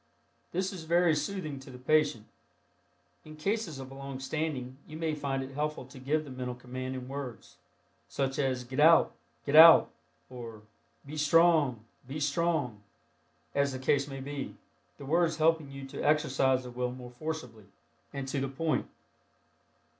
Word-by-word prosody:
This 185 +2 -1
is 185 - -7
very 170 0 +4
soothing 155 -2 -3
to 135 - -12
the 125 - -10
patient. 140 -4 +2 1.0
In 155 0 -11
cases 195 0 -2
of 135 0 -8
long 135 -1 -7
standing 135 -3 -3
you 155 - -8
may 160 -1 -1
find 140 -3 -2
it 135 - -8
helpful 150 -1 -3
to 130 +1 -13
give 150 +4 0
the 145 - -10
mental 125 -1 -4
command 130 +1 -6
in 125 -1 -6
words, 135 -4 -7 0.5
such 135 -1 -2
as 130 -3 0
"get 130 +3 -5
out, 165 +2 +6 0.3
get 145 - 0
out," 165 +1 +10 0.4
or 115 -4 -9 0.4
"be 150 +2 -7
strong, 150 -6 +4 0.2
be 140 +4 -5
strong," 145 -6 0 0.7
as 140 -1 +1
the - - -3
case 135 +2 +1
may 135 -1 -6
be, 140 0 -5 0.4
the 140 - -9
words 165 +2 +2
helping 160 -2 +2
you 135 0 -8
to - - -6
exercise 135 -3 +2
the 125 - -8
will 125 0 -2
more 125 -1 -9
forcibly 125 -6 -6 0.5
and 140 -1 -5
to 140 - -1
the 135 - -1
point. 155 +4 -1
140 Hz, 160 wpm, -30 LUFS, 130-155 Hz, 1.0 s, out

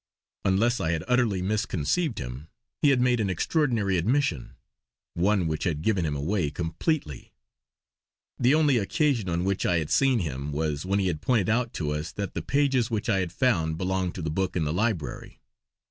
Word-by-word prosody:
Unless 115 +6 +2
I 80 0 0
had 80 - -2
utterly 120 -7 +2
misconceived 105 - -1
him, 65 +4 -6 0.3
he 145 - +5
had 135 -2 +3
made 125 -1 +2
an 105 -3 0
extraordinary 105 - +1
admission; 105 - 0 0.6
one 95 +1 +2
which 80 -1 -2
had 80 -3 -1
given 95 -6 +1
him 75 - -2
away 80 +3 0
completely. 85 - -3 1.1
The 125 +4 +4
only 150 -5 +3
occasion 110 - 0
on 85 0 0
which 95 0 0
I 90 - +2
had 80 -2 -3
seen 135 -2 +4
him 75 - -3
was 75 +2 -2
when 100 +1 +1
he 100 - +1
had 85 -5 -1
pointed 115 -7 +1
out 115 +1 +1
to 75 -3 -2
us 75 +2 -3
that 100 -2 -4
the 85 - -3
pages 135 - +1
which 110 -3 -2
I 95 - +3
had 90 -3 -2
found 85 -9 +1
belonged 95 0 -1
to 90 - -5
the 80 - -2
book 95 +3 -1
in 85 - +1
the 75 0 -1
library. 100 -5 -2
95 Hz, 190 wpm, -26 LUFS, 80-120 Hz, 1.1 s, he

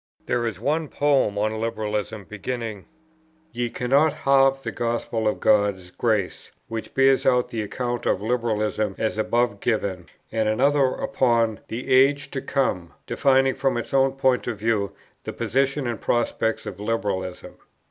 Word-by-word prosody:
There 120 -1 0
is 100 -5 -5
one 155 +6 0
poem 140 -8 +1
on 110 +1 -1
"Liberalism," 110 -2 -3
beginning 110 0 -5 0.6
"Ye 120 -3 -2
cannot 140 +6 +2
halve 135 -2 +3
the - - -3
Gospel 115 -1 -2
of 105 - 0
God's 100 -4 +2
grace;" 105 -5 -1 0.2
which 115 -1 -6
bears 135 0 +4
out 125 -1 +2
the 115 - -3
account 120 +3 -3
of - - +2
Liberalism 110 -2 -1
as 110 -1 -1
above 120 -1 +1
given; 100 -7 -1 0.2
and 110 -1 +1
another 140 +5 +3
upon 115 -4 +1
"the 125 +3 -2
Age 140 +2 +4
to 135 - -3
come," 90 -11 -1
defining 135 -1 +3
from 135 -2 0
its 120 - -5
own 135 0 +3
point 130 -2 +1
of 120 -3 -2
view 105 -2 0 0.3
the - - -5
position 135 +2 0
and 120 -3 -3
prospects 115 -1 0
of 95 - -7
Liberalism. 100 -4 -3
115 Hz, 150 wpm, -24 LUFS, 105-135 Hz, 0.6 s, bears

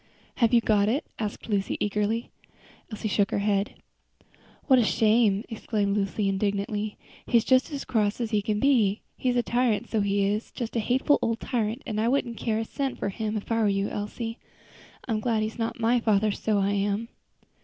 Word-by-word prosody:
"Have 230 -3 +3
you 240 -1 +5
got 210 -2 +3
it?" 270 +7 0
asked 210 -2 -4
Lucy, 200 -3 -1
eagerly. 210 +3 -1 0.6
Elsie 215 0 -3
shook 200 -1 +2
her - - -1
head. 200 0 0 0.9
"What 260 -3 +5
a - - +4
shame!" 215 -2 +3
exclaimed 210 -2 -1
Lucy, 200 0 0
indignantly. 205 +2 -1 0.3
"He's 235 -2 +4
just 260 +3 +3
as 285 -2 -4
cross 215 -4 0
as 235 -2 -2
he 210 -2 +2
can 210 0 -1
be. 230 -7 +3
He's 250 -1 0
a 245 - +2
tyrant, 240 -3 0
so 220 - +1
he 200 0 +1
is! 210 +3 -1
just 235 -1 -5
a - - +2
hateful 255 +6 +2
old 230 0 0
tyrant, 230 +1 -2
and 215 -1 -2
I 225 - +1
wouldn't 240 -2 0
care 220 -2 -1
a 225 - -1
cent 275 +2 -3
for - - -2
him, 215 +1 -3
if 210 - -7
I 225 0 +2
were 215 - +3
you, 195 0 0
Elsie. 225 +3 -5 0.7
I'm 225 -3 0
glad 220 0 0
he 215 - 0
is 220 - -14
not 230 +1 -2
my 235 +2 +3
father, 215 -2 +2
so 210 +1 0
I 200 0 +1
am." 205 +3 -1
215 Hz, 200 wpm, -26 LUFS, 205-235 Hz, 0.9 s, you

